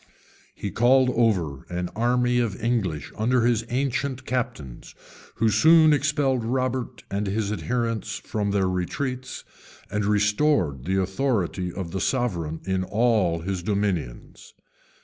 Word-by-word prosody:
He 100 Hz, -, -5 dB
called 125 Hz, +2 st, +4 dB
over 90 Hz, -, 0 dB
an 90 Hz, 0 st, -3 dB
army 125 Hz, +2 st, +2 dB
of 115 Hz, -5 st, -1 dB
English 100 Hz, -, -1 dB
under 120 Hz, +2 st, +2 dB
his 120 Hz, -2 st, +2 dB
ancient 130 Hz, 0 st, -2 dB
captains, 120 Hz, -, -4 dB, 0.4 s
who 110 Hz, 0 st, +2 dB
soon 160 Hz, +6 st, +6 dB
expelled 145 Hz, -4 st, +1 dB
Robert 130 Hz, +1 st, -2 dB
and 100 Hz, +1 st, -1 dB
his 100 Hz, +1 st, -1 dB
adherents 115 Hz, 0 st, -2 dB
from 105 Hz, -2 st, -3 dB
their 100 Hz, -2 st, +1 dB
retreats, 125 Hz, +9 st, -3 dB, 0.5 s
and 105 Hz, 0 st, -1 dB
restored 105 Hz, -, +1 dB
the 95 Hz, +2 st, +1 dB
authority 95 Hz, -3 st, -1 dB
of 90 Hz, -2 st, -6 dB
the 95 Hz, 0 st, -3 dB
sovereign 85 Hz, -, -1 dB
in 95 Hz, -1 st, 0 dB
all 105 Hz, -5 st, +1 dB
his 95 Hz, +1 st, -3 dB
dominions. 95 Hz, -, -3 dB
110 Hz, 130 wpm, -25 LUFS, 95-125 Hz, 0.5 s, soon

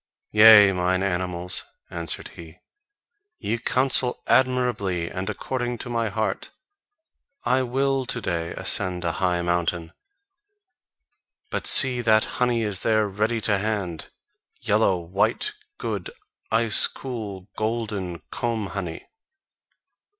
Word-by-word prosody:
"Yea, 105 Hz, -2 st, +8 dB
mine 90 Hz, +1 st, 0 dB
animals," 90 Hz, -1 st, -2 dB, 0.3 s
answered 85 Hz, -2 st, -3 dB
he, 80 Hz, 0 st, -13 dB, 0.8 s
"ye 115 Hz, -, -3 dB
counsel 130 Hz, 0 st, +1 dB
admirably 120 Hz, -10 st, +1 dB
and 95 Hz, +2 st, -4 dB
according 120 Hz, +2 st, -3 dB
to 120 Hz, -, -7 dB
my 115 Hz, -2 st, -1 dB
heart: 110 Hz, +2 st, -3 dB, 1.0 s
I 130 Hz, +1 st, +3 dB
will 135 Hz, +1 st, -1 dB
to 120 Hz, -, -2 dB
day 85 Hz, -5 st, -3 dB
ascend 90 Hz, -2 st, 0 dB
a 85 Hz, -, +1 dB
high 90 Hz, -2 st, +1 dB
mountain! 85 Hz, -1 st, -1 dB, 1.6 s
But -, -, -3 dB
see 125 Hz, -2 st, +6 dB
that 110 Hz, -2 st, +4 dB, 0.2 s
honey 120 Hz, -2 st, +2 dB
is 105 Hz, -3 st, -1 dB
there 110 Hz, -1 st, +1 dB
ready 110 Hz, +4 st, -1 dB
to 105 Hz, -1 st, +2 dB
hand, 100 Hz, -6 st, -3 dB, 0.5 s
yellow, 95 Hz, -, +2 dB
white, 90 Hz, -, 0 dB, 0.3 s
good, -, -, -4 dB, 0.4 s
ice 115 Hz, -1 st, +4 dB
cool, 105 Hz, -8 st, -7 dB
golden 105 Hz, -6 st, -3 dB
comb 115 Hz, -5 st, -3 dB
honey. 90 Hz, -4 st, -5 dB
105 Hz, 115 wpm, -24 LUFS, 90-120 Hz, 1.6 s, Yea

